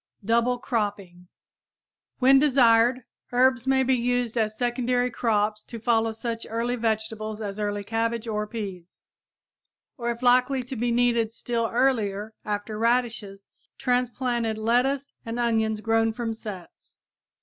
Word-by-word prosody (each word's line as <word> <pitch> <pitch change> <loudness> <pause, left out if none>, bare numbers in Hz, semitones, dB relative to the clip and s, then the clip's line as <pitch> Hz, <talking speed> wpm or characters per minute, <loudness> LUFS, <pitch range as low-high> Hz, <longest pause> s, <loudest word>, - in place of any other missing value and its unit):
DOUBLE 235 +3 +2
CROPPING 200 -7 -3 0.9
When 270 +1 +6
desired, 250 -3 +4 0.3
herbs 255 0 +3
may 265 0 +3
be 260 +1 +2
used 245 -1 0
as 215 -2 0
secondary 245 0 0
crops 215 -2 0
to 235 - -8
follow 225 0 +1
such 230 +1 -5
early 230 +2 -1
vegetables 220 -1 -2
as 205 -1 -5
early 205 -1 -2
cabbage 230 +2 -1
and 210 -1 -2
peas; 195 -6 -7 0.9
or, 235 0 -2
if 235 +1 -4
likely 250 +1 +3
to 255 +2 -7
be 240 +1 -1
needed 235 -2 +2
still 230 0 -2
earlier, 220 -4 0
after 210 +1 -4
radishes, 225 -4 -1 0.3
transplanted 245 -3 0
lettuce 250 +5 +1
and 230 +1 -5
onions 220 -2 +1
grown 225 0 +2
from 230 -1 -3
sets. 210 -5 -10
230 Hz, 130 wpm, -25 LUFS, 215-245 Hz, 0.9 s, When